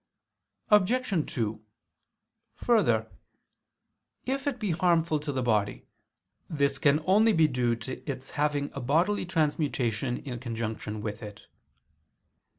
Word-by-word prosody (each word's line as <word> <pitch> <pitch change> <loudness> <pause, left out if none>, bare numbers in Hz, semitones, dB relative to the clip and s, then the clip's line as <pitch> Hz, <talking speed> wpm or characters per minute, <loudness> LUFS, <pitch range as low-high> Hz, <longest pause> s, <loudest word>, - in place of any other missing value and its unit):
Obj. 210 -3 +2
2: 110 -2 -2 0.9
Further 235 -3 +2 1.1
if 270 +2 -2
it 275 -3 -1
be 210 -5 -1
harmful 165 -2 +2
to 145 0 -4
the 130 -2 -2
body, 105 -4 0 0.6
this 140 -4 0
can 150 +1 +3
only 215 +4 +4
be 160 -4 +5
due 125 -4 0
to 115 +3 -7
its 135 0 -5
having 145 -1 -1
a 140 - -5
bodily 170 +10 +1
transmutation 140 - 0
in 125 -4 -6
conjunction 110 -3 -4
with 105 0 -5
it. 105 -1 -10
145 Hz, 120 wpm, -28 LUFS, 120-180 Hz, 1.1 s, be